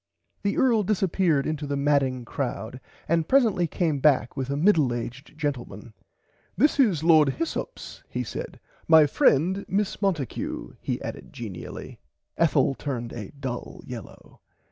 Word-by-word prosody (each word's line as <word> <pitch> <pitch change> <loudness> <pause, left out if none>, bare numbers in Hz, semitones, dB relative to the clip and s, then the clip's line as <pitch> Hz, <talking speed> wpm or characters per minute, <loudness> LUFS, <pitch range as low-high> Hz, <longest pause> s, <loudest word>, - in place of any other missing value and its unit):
The 200 0 -1
earl 235 -4 +4
disserppeard 185 -7 +1
into 155 -1 -3
the 140 0 -1
madding 140 -3 +1
crowd 125 -1 -4 0.3
and 165 -1 +1
presently 225 -10 +3
came 160 -3 0
back 135 -4 +3
with 135 -1 -3
a 140 - -1
middle 155 -8 +3
aged 125 +6 -7
gentleman. 120 -7 -4 0.6
This 295 +4 +3
is 195 - +3
Lord 160 -4 +6
Hyssops 330 +8 -5
he - - -2
said - - -6 0.3
my 160 -2 +8
friend 170 +7 +2
Miss 200 +1 -1
Monticue 170 - -2
he - - -2
added - - -7
genially. 100 -7 -8 0.4
Ethel - - +3
turned 125 -4 -4
a 105 -5 -6
dull 130 -3 -5
yellaw. - - -10
150 Hz, 140 wpm, -26 LUFS, 130-185 Hz, 0.6 s, my